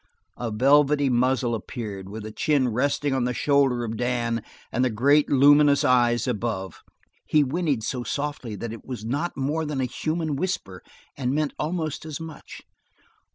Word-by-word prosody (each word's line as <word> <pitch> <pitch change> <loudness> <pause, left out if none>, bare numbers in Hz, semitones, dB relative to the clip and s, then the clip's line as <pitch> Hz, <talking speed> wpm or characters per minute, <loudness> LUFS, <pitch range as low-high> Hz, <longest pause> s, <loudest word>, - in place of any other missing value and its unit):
A 120 - -2
velvety 140 +5 +4
muzzle 125 0 +1
appeared, 105 -3 -6
with 105 +1 -7
the 110 - -7
chin 140 +1 +1
resting 140 +4 0
on 130 -2 +1
the 125 0 -1
shoulder 140 -4 +2
of 115 -1 -4
Dan 120 -1 -1 0.3
and 125 - +1
the 130 - +2
great, 140 +7 +3
luminous 145 +1 +5
eyes 120 -2 +3
above. 105 -6 -3 0.5
He 150 -1 +4
whinnied 145 -4 -1
so 125 +2 -2
softly 140 -5 -4
that 115 +2 -5
it 115 - -10
was 120 -5 -7
not 145 +9 -2
more 145 +4 -1
than 150 -3 -3
a 130 - +1
human 155 +4 -2
whisper, 135 - -3 0.3
and 130 0 -1
meant 150 -1 0
almost 155 -1 -2
as 155 -2 -6
much. 160 -1 -10
130 Hz, 165 wpm, -25 LUFS, 120-145 Hz, 0.5 s, luminous